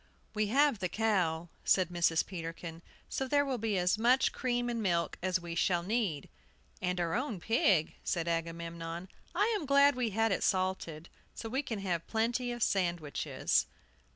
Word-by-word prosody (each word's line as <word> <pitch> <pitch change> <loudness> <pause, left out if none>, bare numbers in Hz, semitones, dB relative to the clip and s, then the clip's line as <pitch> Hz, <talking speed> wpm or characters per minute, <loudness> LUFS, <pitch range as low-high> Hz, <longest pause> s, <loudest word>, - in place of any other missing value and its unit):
"We 215 -1 +1
have 275 0 +3
the 180 -2 -1
cow," 175 -6 0
said 185 -3 +3
Mrs. 170 -2 +2
Peterkin, 165 -2 -7 0.3
"so 265 - -2
there 285 +1 +3
will 260 -3 -2
be 215 -2 0
as 180 +4 +2
much 250 +4 +4
cream 245 -2 -1
and 235 -1 -2
milk 170 -4 0
as 185 0 +1
we 170 -1 -6
shall 175 0 +1
need." 195 - -1 0.5
"And 180 0 -1
our 170 -1 0
own 235 -5 -2
pig," 195 -6 +2
said 170 -2 -1
Agamemnon. 165 +1 -4 0.3
"I 425 +5 +2
am 325 -9 -3
glad 280 +1 +6
we 250 -2 0
had 225 +2 +1
it 195 - 0
salted; 185 -4 -1 0.3
so 225 - -6
we 260 +4 0
can 235 -6 -4
have 175 -4 -2
plenty 240 +2 0
of 240 -1 -2
sandwiches." 175 -6 0
190 Hz, 170 wpm, -32 LUFS, 170-240 Hz, 0.5 s, glad